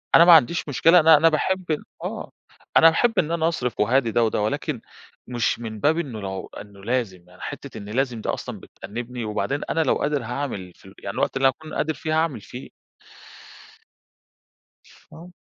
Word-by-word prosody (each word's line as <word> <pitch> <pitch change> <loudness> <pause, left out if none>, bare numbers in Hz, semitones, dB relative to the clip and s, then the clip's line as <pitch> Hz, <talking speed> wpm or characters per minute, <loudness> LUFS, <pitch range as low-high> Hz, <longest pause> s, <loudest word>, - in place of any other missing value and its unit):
أنا 170 - +8
ما 175 - +9
عنديش 160 +1 +4
مشكلة 165 +5 +5
أنا 160 0 +7
أنا 165 +3 +5
باحب 185 +4 0 0.4
آه، - - -5 0.5
أنا 165 - +8
باحب 225 +8 +2
إن 165 -1 0
أنا 165 -1 +1
أصرف 125 -8 -2
وأهادي 115 +2 +2
ده 120 - +2
وده، 110 -1 0
ولكن 130 +3 -2 0.5
مش 120 -2 -1
من 110 -2 -6
باب 155 +8 +2
إنه 130 -9 -5
لو 95 -1 -5
إنه 100 -1 -14
لازم، 100 -7 -3
يعني 90 - -18
حِتّة - - -7
إن 100 - -8
لازم 125 0 -1
دي - - -4
أصلًا - - -4
بتأنبني، 120 +2 -7
وبعدين 135 +7 -2
أنا 165 - +1
لو 135 - +2
قادر 145 -1 -1
هاعمل 120 -6 -4
في - - -22
ال 95 - -13
يعني 100 - -6
الوقت - - 0
اللي 135 - +4
أكون 155 +4 -4
قادر 160 +1 -1
فيه 155 +1 -4
هاعمل 145 -9 -2
فيه. 125 +6 -10 2.4
آه. 175 +3 -12
130 Hz, 185 wpm, -23 LUFS, 110-160 Hz, 2.4 s, ما